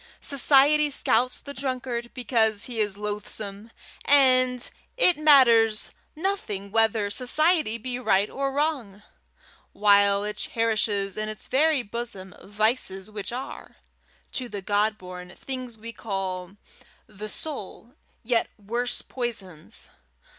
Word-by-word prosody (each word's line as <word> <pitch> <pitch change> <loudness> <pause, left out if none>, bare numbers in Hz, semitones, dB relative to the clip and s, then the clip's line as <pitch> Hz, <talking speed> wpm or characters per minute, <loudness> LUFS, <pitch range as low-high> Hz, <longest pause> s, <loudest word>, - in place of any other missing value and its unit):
Society 290 +2 +4
scouts 250 -2 +1
the 280 - -8
drunkard 250 -3 -4
because 220 -4 +1
he 240 -3 -4
is 205 -2 0
loathsome, 210 0 -5 0.3
and 255 -3 +4 0.3
it 360 -8 +5
matters 235 -8 +5 0.2
nothing 300 - -3
whether 220 -2 +2
society 300 - +3
be 245 +2 -5
right 200 -5 +2
or 275 +3 -3
wrong, 270 -9 -2 0.7
while 200 -1 +4
it 210 0 -4
cherishes 215 -3 -1
in 215 0 -2
its 215 -2 -7
very 295 0 +2
bosom 205 -4 -6
vices 210 -2 -1
which 210 0 -5
are, 255 +2 -7 0.6
to 250 -2 -4
the 205 -3 -6
God 210 +2 +1
born 180 -1 -10
thing 255 -2 -6
we 230 +1 -8
call 190 -3 -5 0.5
the 210 0 -8
soul, 245 -3 -5 0.3
yet 235 0 +1
worse 235 +4 -2
poisons. 200 -10 -5
225 Hz, 120 wpm, -25 LUFS, 205-255 Hz, 0.7 s, it